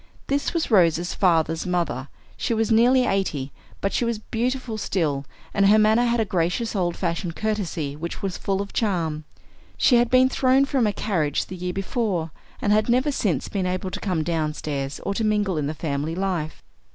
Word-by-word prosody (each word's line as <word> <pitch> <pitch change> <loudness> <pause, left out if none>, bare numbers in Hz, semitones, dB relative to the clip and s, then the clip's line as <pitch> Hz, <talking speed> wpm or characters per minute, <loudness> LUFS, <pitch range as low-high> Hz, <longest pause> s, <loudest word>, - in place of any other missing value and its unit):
This 280 +1 0
was 335 -6 -1
Rose's 175 -3 +3
father's 165 -2 +1
mother. 165 -7 -1 0.3
She 230 - -1
was 225 +1 0
nearly 250 +3 +5
eighty; 155 - -1 0.3
but 195 - -1
she - - +1
was 235 -1 0
beautiful 235 +1 -3
still, 150 -9 -1 0.3
and 200 -1 +4
her 210 +2 +6
manner 220 +3 +4
had 235 0 +1
a 220 - +2
gracious 190 +5 -1
old 175 -3 0
fashioned 170 -1 -2
courtesy 185 -9 -2
which 170 +3 -5
was 190 -2 -2
full 195 0 -1
of 200 - -12
charm. 165 -8 -1 0.5
She 245 - +5
had 240 0 +3
been 255 0 +5
thrown 260 +1 +3
from 270 -5 +1
a - - +2
carriage 170 -8 -1
the 185 - -8
year 180 0 -3
before, 195 -5 -2 0.3
and 205 - +3
had 215 +2 +2
never 255 +5 +3
since 185 - -1
been 190 -3 -2
able 185 +1 -2
to - - -4
come 180 -6 -1
downstairs 150 -4 -2
or 200 - -2
to 225 - -2
mingle 210 -3 +1
in 145 - -1
the 155 - -3
family 150 +1 -2
life. 180 -5 -3
195 Hz, 190 wpm, -24 LUFS, 165-225 Hz, 0.5 s, her